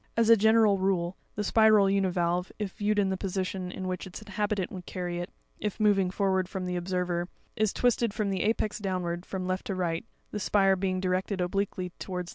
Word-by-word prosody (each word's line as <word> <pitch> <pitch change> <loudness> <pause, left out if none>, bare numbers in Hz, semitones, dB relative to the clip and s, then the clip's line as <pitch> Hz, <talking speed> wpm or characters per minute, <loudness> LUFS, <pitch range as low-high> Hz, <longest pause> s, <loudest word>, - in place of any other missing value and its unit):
As 230 0 +5
a - - +10
general 220 -2 +4
rule, 185 -2 0 0.2
the 210 - -1
spiral 215 -1 +5
univalve, 180 -2 +1
if 210 -3 -3
viewed 210 +2 0
in 200 -2 +3
the 190 - -1
position 185 -1 -3
in 185 0 -5
which 185 +1 -3
its 185 - -8
inhabitant 205 -2 -2
would 180 -2 -8
carry 175 -1 -3
it, 175 - -4 0.3
if 210 +1 -3
moving 200 -3 +3
forwards 190 -1 0
from 190 -2 -4
the 180 0 -2
observer, 175 -1 -1 0.3
is 215 -2 +2
twisted, 240 -2 +2
from 205 -1 -1
the 190 -2 -1
apex 215 -1 0
downwards, 180 -3 -3
from 190 -1 -4
left 185 +3 -2
to 195 - -2
right, 170 -3 -1 0.3
the 210 - -3
spire 195 -1 +3
being 185 0 -1
directed 185 +1 -1
obliquely 185 0 -1
to - - -8
wards 180 -1 -2
the - - -2
right. 175 - -11
190 Hz, 215 wpm, -28 LUFS, 180-205 Hz, 0.3 s, a